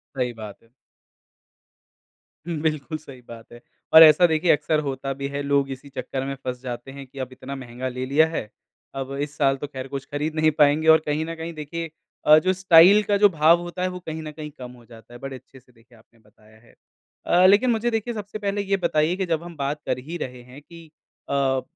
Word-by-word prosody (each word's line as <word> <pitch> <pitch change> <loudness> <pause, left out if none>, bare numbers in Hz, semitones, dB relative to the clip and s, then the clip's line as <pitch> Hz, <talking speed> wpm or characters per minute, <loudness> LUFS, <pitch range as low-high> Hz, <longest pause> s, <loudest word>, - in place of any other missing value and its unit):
सही 125 -2 -2
बात 110 -3 -9
है। 115 - -26 1.8
हुँ, 170 -2 -3
बिल्कुल 155 0 -2
सही 135 -4 -14
बात 115 0 -12
है, 120 - -13 0.3
और 160 0 +11
ऐसा 155 +3 +7
देखिए 160 +2 +2
अक्सर 155 +1 +1
होता 135 0 -4
भी 140 +1 -5
है 140 0 -4
लोग 140 -1 +1
इसी 135 +2 -9
चक्कर 135 0 -5
में 140 - -3
फँस 125 -1 -5
जाते 125 0 -7
हैं 140 0 -10
कि 135 +1 -13
अब 130 0 -5
इतना 130 +2 -8
महँगा 130 -1 -6
ले 130 0 -5
लिया 145 +4 +4
है, 135 -10 -5 0.5
अब 135 0 -5
इस 145 0 -5
साल 135 -2 +2
तो 145 - -6
ख़ैर 130 -2 -7
कुछ 140 0 -6
खरीद 150 +2 -3
नहीं 155 0 +3
पाएँगे 150 +2 +3
और 160 0 +7
कहीं 150 +1 -1
न 165 0 -6
कहीं 165 +1 -7
देखिए 165 +2 -6 0.4
अ, 155 +1 +8
जो 185 +3 +1
स्टाइल 185 +2 +6
का 205 0 +1
जो 205 0 +5
भाव 165 +1 +4
होता 175 +1 -7
है 185 - +1
वो - - -6
कहीं 160 0 -5
न 155 - -7
कहीं 150 0 -9
कम 125 -1 -8
हो 120 -2 -17
जाता 115 +1 -16
है, - - -9
बड़े 135 0 -7
अच्छे 130 +1 -15
से 125 0 -27
देखिए 115 0 -23
आपने 115 +1 -26
बताया 110 0 -23
है। 120 - -23 0.5
अ, 180 +1 +4
लेकिन 210 +6 +4
मुझे 230 +1 0
देखिए 225 +1 -2
सबसे 210 0 -7
पहले 200 0 -2
ये 195 0 0
बताइए 170 -1 +1
कि 190 - -1
जब 165 -1 -2
हम 175 -1 -10
बात 145 +2 -3
कर 125 - -1
ही 175 - -5
रहे 125 -5 -7
हैं 125 +3 -14
कि 165 +2 -15 0.4
अ, 135 -1 +1
145 Hz, 230 wpm, -23 LUFS, 130-165 Hz, 1.8 s, और